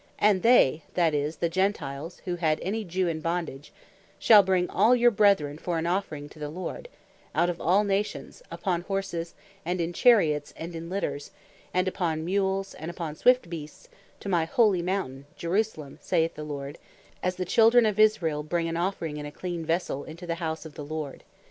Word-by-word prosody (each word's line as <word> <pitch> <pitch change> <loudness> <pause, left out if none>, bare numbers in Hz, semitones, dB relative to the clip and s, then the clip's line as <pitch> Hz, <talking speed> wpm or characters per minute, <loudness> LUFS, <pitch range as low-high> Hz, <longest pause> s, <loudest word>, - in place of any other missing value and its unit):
"And 205 -3 +3
they," 195 - +5
(that 170 -3 +3
is, 150 +2 -1
the 170 - 0
Gentiles 165 -4 -2
who 180 -2 -2
had 155 -3 +1
any 215 +4 -2
Jew 185 0 -1
in 160 -2 -2
bondage) 165 -4 -3 0.5
"shall 215 -3 +7
bring 185 -2 +1
all 220 +7 +4
your 240 0 +5
brethren, 195 -9 +3
for 175 -1 -2
an 160 - -2
offering 170 -5 -2
to 155 - -15
the 150 -1 -4
Lord, 185 - -6 0.5
out 175 +1 +3
of 170 - -9
all 190 +5 +3
nations, 200 - -2
upon 180 -4 -2
horses, 185 -3 -4 0.3
and 180 0 -2
in 170 +1 -1
charets, 165 - +3
and 170 +1 -7
in 165 +1 -6
litters, 180 -6 -3 0.4
and 185 +1 +1
upon 160 -4 -1
mules, 195 +1 0
and 160 - -7
upon 165 -3 -5
swift 250 +2 +4
beasts, 165 - -9 0.3
to - - -7
my 175 -4 +2
holy 200 0 +3
mountain, 170 -7 -3
Jerusalem, 170 -5 -2
saith 165 0 +1
the 150 - -7
Lord, 145 0 -6 0.4
as 185 0 -1
the 185 - -3
Children 230 +5 +5
of 215 -1 0
Israel 175 -9 +3
bring 165 +2 -1
an 165 0 -2
offering 170 -4 -2
in 150 0 -5
a - - -8
clean 175 +1 -5
vessell 165 -3 -1
into 170 +3 -9
the 170 0 -4
House 160 -1 -3
of 155 - -9
the 150 - -7
Lord. 150 -1 -5
170 Hz, 190 wpm, -27 LUFS, 155-195 Hz, 0.5 s, shall